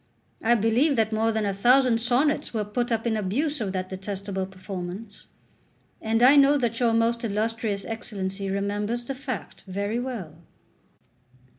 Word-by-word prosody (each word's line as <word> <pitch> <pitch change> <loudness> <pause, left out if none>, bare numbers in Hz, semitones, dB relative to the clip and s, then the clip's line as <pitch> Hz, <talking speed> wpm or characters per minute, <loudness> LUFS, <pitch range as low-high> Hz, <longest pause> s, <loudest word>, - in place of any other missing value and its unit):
I 235 +2 +4
believe 235 +7 +3
that 220 -2 +1
more 225 +1 +2
than 220 -1 -1
a 200 - 0
thousand 245 +3 +4
sonnets 255 +3 +1
were 215 -1 0
put 240 +4 -2
up 225 0 0
in 230 -2 +1
abuse 240 +9 -1
of 200 -3 -1
that 185 -1 -3
detestable 195 0 -4
performance; 190 +2 -8 0.7
and 225 +2 +1
I 265 +3 +8
know 285 +1 +6
that 235 -4 -1
your 240 -2 +3
most 230 +1 +1
illustrious 220 -1 -1
Excellency 200 -4 -4
remembers 205 +4 -2
the 275 - -3
fact 255 -4 -6
very 200 +4 -2
well. 210 - -6
225 Hz, 155 wpm, -25 LUFS, 200-240 Hz, 0.7 s, I